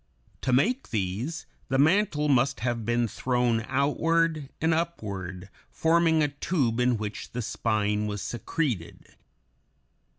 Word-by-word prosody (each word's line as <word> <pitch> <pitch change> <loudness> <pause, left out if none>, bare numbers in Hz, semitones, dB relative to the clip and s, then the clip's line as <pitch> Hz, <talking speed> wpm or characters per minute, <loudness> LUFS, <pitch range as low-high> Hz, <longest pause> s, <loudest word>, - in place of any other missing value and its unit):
To 130 - 0
make 230 - +2
these, 110 - -2 0.2
the 135 - +1
mantle 155 0 +3
must 135 0 +2
have 120 -2 -1
been 120 +1 +1
thrown 120 -1 0
outward 155 +2 +1
and 160 +1 +2
upward, 100 - -3 0.2
forming 160 -1 +3
a 145 - +1
tube 135 -5 -1
in 125 -1 +3
which 105 -1 -6
the 125 - -2
spine 105 -2 0
was 105 -1 -4
secreted. 120 - -3
125 Hz, 125 wpm, -27 LUFS, 110-160 Hz, 0.2 s, mantle